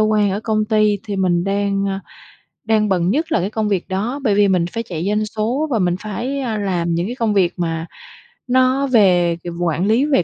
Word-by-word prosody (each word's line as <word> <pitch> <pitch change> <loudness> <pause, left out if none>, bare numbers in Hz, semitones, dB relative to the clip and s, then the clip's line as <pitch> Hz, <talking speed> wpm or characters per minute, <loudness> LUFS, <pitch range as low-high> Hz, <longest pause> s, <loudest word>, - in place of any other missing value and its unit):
quan, 215 -2 +2
ở 200 +2 -2
công 215 -1 0
ty, 215 -1 +2
thì 205 -2 -4
mình 180 -2 +1
đang, 200 0 0
ơ, 195 0 -2 0.7
đang 215 -1 +2
bận 180 -2 +1
nhất 310 +9 0
là - - +2
cái 185 +4 -1
công 220 -1 -2
việc 195 -4 -1
đó, 215 +9 -2
bởi 210 -6 +2
vì 205 0 +4
mình 180 -3 +2
phải 230 - -2
chạy 175 -4 -5
doanh 210 +1 +1
số 225 +8 -1
và 230 - +1
mình 175 -2 +1
phải, 240 +7 -4
à, 235 -5 -2
làm 175 -4 -1
những 170 +3 -1
cái 245 - -5
công 225 -4 0
việc 185 -3 +2
mà 165 -1 -2 0.6
nó 260 +2 +2
về 180 -8 +3 0.2
quản 170 +1 0
lý 235 +6 +3
về 275 -12 +2
205 Hz, 225 wpm, -19 LUFS, 185-225 Hz, 0.7 s, vì